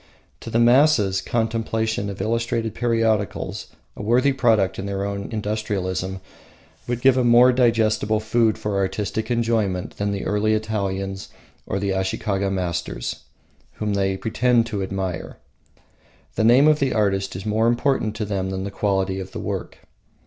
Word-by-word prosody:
To - - -8
the 115 - 0
masses, 120 -5 +4
contemplation 110 -2 -1
of 100 - -7
illustrated 115 -1 -1
periodicals, 115 -3 -1 0.3
the - - -8
worthy 125 +6 +3
product 110 -8 +2
of 100 - -4
their 100 0 -2
own 100 0 -4
industrialism, 100 -3 -3 0.7
would 120 0 -2
give 130 -1 +5
more 120 +1 +6
digestible 110 -3 +2
food 110 0 +1
for 105 -2 -2
artistic 100 +3 -2
enjoyment 115 -6 -1
than 100 0 -1
the 100 -1 -3
early 110 +1 +1
Italians 100 -3 -3 0.4
or - - -2
the 100 0 -1
Ashikaga 95 +1 -1
masters, 85 -3 -3 0.6
whom 105 -1 -2
they 95 -1 0
pretend 115 +2 +2
to 105 -4 -4
admire. 95 -3 -4 1.0
The 110 - 0
name 125 +6 +6
of 155 -1 +4
the 135 -2 +1
artist 95 -3 0
is 95 +3 -6
more 110 +2 +1
important 120 -3 +1
to 110 -1 -3
them 95 -2 -2
than 95 0 -3
the 100 - -5
quality 95 -1 0
of 95 0 -8
the - - -5
work. - - -5
105 Hz, 150 wpm, -22 LUFS, 95-115 Hz, 1.0 s, more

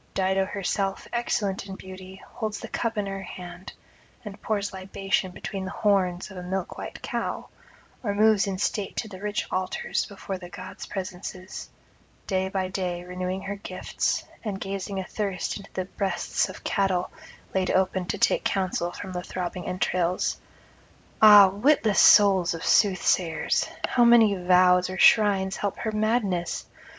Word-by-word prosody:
Dido 190 0 +2
herself, 195 0 -2
excellent 205 -5 -1
in 190 - -6
beauty, 190 0 -11
holds 215 -1 -5
the - - -7
cup 230 -2 -2
in 205 - 0
her 195 0 -4
hand, 180 0 -9 0.5
and 205 -1 -8
pours 205 -2 -2
libation 190 0 -2
between 190 +1 -6
the 190 - -4
horns 195 -3 0
of 190 - -10
a - - -5
milk 185 0 -3
white - - -8
cow, - - -3 0.5
or 205 -4 -2
moves 215 -1 +4
in 195 -1 -2
state 205 +1 -2
to - - -2
the 190 -3 -10
rich 210 0 -2
altars 185 0 -1
before 195 -1 -6
the 175 -1 -10
gods' - - -9
presences, 185 0 -6 0.6
day 190 -1 0
by 190 -1 -1
day 180 -2 -3
renewing 180 +1 -4
her 200 +1 -4
gifts, 200 - -2 0.2
and 205 -4 -3
gazing 195 0 -4
athirst 190 -1 -3
into 200 -1 -12
the 185 - -2
breasts 190 -1 -1
of 190 - -10
cattle 190 -2 0 0.4
laid 190 -1 +1
open 190 -1 +1
to - - -2
take - - +2
counsel 185 -3 -1
from 190 +2 -7
the 180 -1 -3
throbbing 180 0 -5
entrails. 180 -1 0 0.8
Ah, 210 -2 +10
witless 215 0 +2
souls 190 -4 +6
of 165 - -6
soothsayers! 185 -5 +2 0.2
how 245 - +3
may 235 -3 +6
vows 180 0 +5
or 185 - -5
shrines 195 -3 +4
help 200 -1 -2
her 220 - -2
madness? 215 -5 0
190 Hz, 155 wpm, -26 LUFS, 185-205 Hz, 0.8 s, Ah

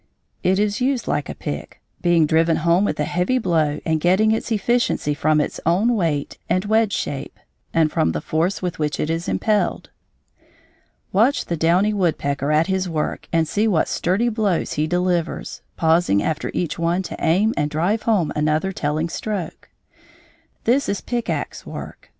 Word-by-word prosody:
It 190 +1 +2
is 210 +2 0
used 260 -1 0
like 145 0 -1
a - - -5
pick, 75 +2 -6 0.2
being 175 -3 +4
driven 160 +2 +3
home 170 +4 +4
with - - -2
a - - +2
heavy 180 +9 0
blow 160 -9 +1
and 160 -1 0
getting 190 +6 +3
its 225 +1 -2
efficiency 225 -7 +1
from 155 +1 +2
its 150 - -2
own 200 +9 +2
weight 160 -8 -1
and 185 +3 +1
wedge 220 0 +2
shape 140 0 -4 0.3
and 160 -2 +2
from 80 - +1
the 75 - -2
force 170 - -1
with 180 -3 -3
which 150 -1 -1
it 155 - 0
is 165 +1 -3
impelled. 210 -2 0 1.2
Watch 230 +9 +2
the 170 - -2
downy 175 +6 +2
woodpecker 150 -7 0
at 155 +2 +3
his 190 -1 -1
work 155 -2 -3
and 165 -2 +2
see 210 +7 +1
what 180 -7 +2
sturdy 195 +7 +1
blows 215 -6 0
he 150 +1 0
delivers, 175 -1 -1 0.2
pausing 160 - +3
after 160 0 -2
each 170 -1 -2
one 170 +3 +1
to - - -6
aim 200 +8 +3
and 150 - 0
drive 175 +9 0
home 205 -9 +1
another 155 +5 +1
telling 155 -1 -1
stroke. 190 -1 -5 0.9
This 255 +5 +2
is 200 - -1
pick 240 -2 -3
axe - - -3
work. - - -9
175 Hz, 175 wpm, -21 LUFS, 155-205 Hz, 1.2 s, being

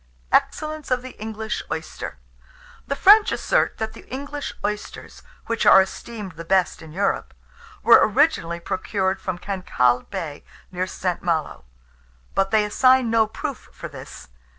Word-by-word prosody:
EXCELLENCE 310 -1 0
OF 255 -1 0
THE 255 - -8
ENGLISH 220 0 -4
OYSTER. - - -5 0.7
The 280 - -1
French 415 +7 +6
assert - - +1
that 220 0 -3
the - - -14
English 285 +2 -5
oysters, 210 0 -5 0.2
which 230 -1 -1
are 195 - +8
esteemed 200 +1 -3
the 165 0 -9
best 185 +1 +1
in 160 -1 -11
Europe, 195 +5 -1 0.5
were 235 - +8
originally 215 - +2
procured 190 +2 -2
from 185 -2 -3
Cancalle 175 -11 +1
Bay, 150 -3 -5 0.3
near 185 0 -2
St. 180 -1 -3
Malo; 165 - -2 0.7
but 195 0 +1
they 215 0 +3
assign 255 +2 +4
no 225 -1 +4
proof 280 +5 -6
for - - -8
this. - - -11
210 Hz, 145 wpm, -23 LUFS, 185-255 Hz, 0.7 s, are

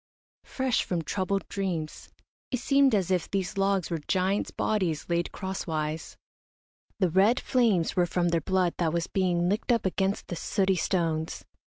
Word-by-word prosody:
Fresh 260 -2 0
from 170 -3 -2
troubled 195 +3 -2
dreams, 175 -6 -4 0.4
it 255 - 0
seemed 275 -1 +4
as 190 -2 0
if 180 -3 0
these 195 0 -2
logs 195 -2 +1
were 165 - -1
giants' 190 +2 +1
bodies 185 -8 -1
laid 170 0 0
crosswise. 160 -5 -4 0.8
The 185 -4 +1
red 200 +8 +4
flames 225 -10 +2
were 180 -1 +3
from 175 0 +1
their 170 -1 +1
blood 185 +1 +1
that 165 -2 +1
was 170 -1 0
being 175 -2 +1
licked 205 +6 0
up 230 -3 +2
against 190 +1 0
the 175 - -5
sooty 190 +2 +1
stones. 165 -3 -1
185 Hz, 160 wpm, -28 LUFS, 170-200 Hz, 0.8 s, seemed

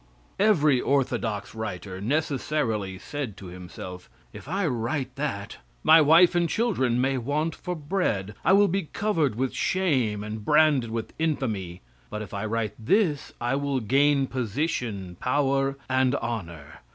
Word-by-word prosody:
Every 155 -11 +4
orthodox 120 -6 -1
writer 95 -4 -5
necessarily 125 -6 -1
said 135 -1 -5
to 100 - -10
himself, 90 0 -9 0.2
"If - - -11
I 190 +4 -1
write 125 0 -2
that, 135 -9 -4 0.3
my 160 +1 +7
wife 165 +4 +6
and 175 -1 +1
children 135 - +1
may 130 +1 +1
want 150 +6 -1
for 180 -1 -5
bread, 145 - -1
I 185 - +4
will 200 +1 +6
be 190 -3 -2
covered 165 - +1
with 130 +2 -1
shame 130 - 0
and 105 0 -6
branded 150 -3 +4
with 115 0 -4
infamy, 110 - -2 0.3
but 105 0 -4
if 105 - -11
I 100 +2 -3
write 110 -1 -1
this, 170 - +1
I 120 +2 -1
will 140 -1 -1
gain 140 +4 +3
position, 115 - -3
power 135 0 +1
and 130 +1 +2
honor. 85 - -5
130 Hz, 145 wpm, -26 LUFS, 110-155 Hz, 0.3 s, my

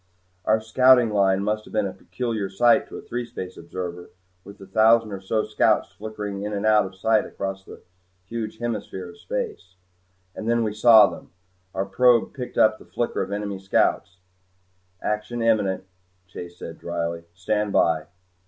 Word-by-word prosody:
Our 110 +1 +3
scouting 125 +1 +5
line 100 -1 +2
must 110 +1 -1
have - - -14
been 105 -2 +1
a 95 - -4
peculiar 115 -6 -4
sight 120 +8 +3
to - - -8
a - - -9
threespace 115 -6 -6
observer 90 +1 -7 0.3
with 100 - -12
the 95 - -12
thousand 110 +3 +4
or 95 -1 -6
so 110 +3 0
scouts - - +2
flickering 105 -2 -6
in 105 +1 -4
and 100 +1 -2
out 105 -2 +4
of 95 - -13
sight 110 +3 +2
across 95 0 -6
a - - -10 0.5
huge 110 +1 -5
hemisphere 105 -6 -4
of 85 - -14
space. 95 +1 -5 0.6
And 110 - -4
then 120 0 +2
we 105 -2 -1
saw 110 0 +8
them. - - -7 0.5
Our 95 +1 0
probe 120 +4 +3
picked 125 -2 -7
up 110 0 +4
the - - -15
flicker 120 - -2
of - - -4
enemy 100 -1 -3
scouts. 95 -1 0 0.9
"Action 105 +3 -2
imminent," 105 -5 +1 0.4
Chase 90 -1 -10
said - - -9
drily. 85 -1 -4
"Stand 105 +2 -1
by." 80 -4 +2
105 Hz, 170 wpm, -24 LUFS, 95-110 Hz, 0.9 s, saw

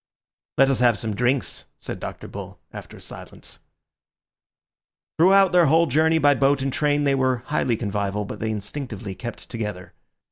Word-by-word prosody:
"Let 135 +1 +5
us 135 - 0
have 120 -3 +4
some 110 -2 -3
drinks," 125 +4 -1
said - - -6
Dr. - - -7
Bull, - - -8 0.2
after - - -10
a - - -13
silence. - - -10 1.6
Throughout 195 +2 +6
their 175 -3 +5
whole 165 +4 +4
journey 160 +3 +3
by 145 -2 +5
boat 140 0 +2
and 135 -1 -2
train 145 -1 +1
they 140 -1 +2
were 130 -2 +1
highly 130 -6 0
convivial, 105 -1 -2
but - - -7
they 110 - -2
instinctively 110 -1 -5
kept 120 +5 -8
together. 105 -6 -6
130 Hz, 165 wpm, -23 LUFS, 110-145 Hz, 1.6 s, Throughout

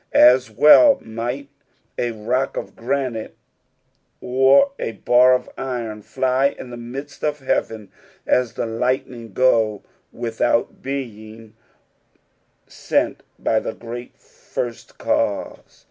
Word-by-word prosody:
As 125 0 +6
well 150 - +7
might 120 +5 -5 0.5
a 120 - -1
rock 120 +4 -2
of - - -6
granite, 125 -2 -3 0.8
nr 135 - +4
n 115 - -4
bar 125 +1 +6
of 125 - -3
iron 115 -5 -4
fij 130 +5 0
in 125 - -9
the - - -6
midst 135 +5 -8
of^ 150 -2 -2
heaven, 110 -5 -2 0.3
as 125 -3 +1
the - - -3
lightoing 115 -1 -2
go 110 -5 +2 0.3
without 115 0 -1
being 110 -5 -7 1.2
wot - - -1 0.2
by - - +1
the - - -5
great 120 +1 -9
First 120 -2 -7
Cause. - - -2
120 Hz, 115 wpm, -21 LUFS, 115-130 Hz, 1.2 s, well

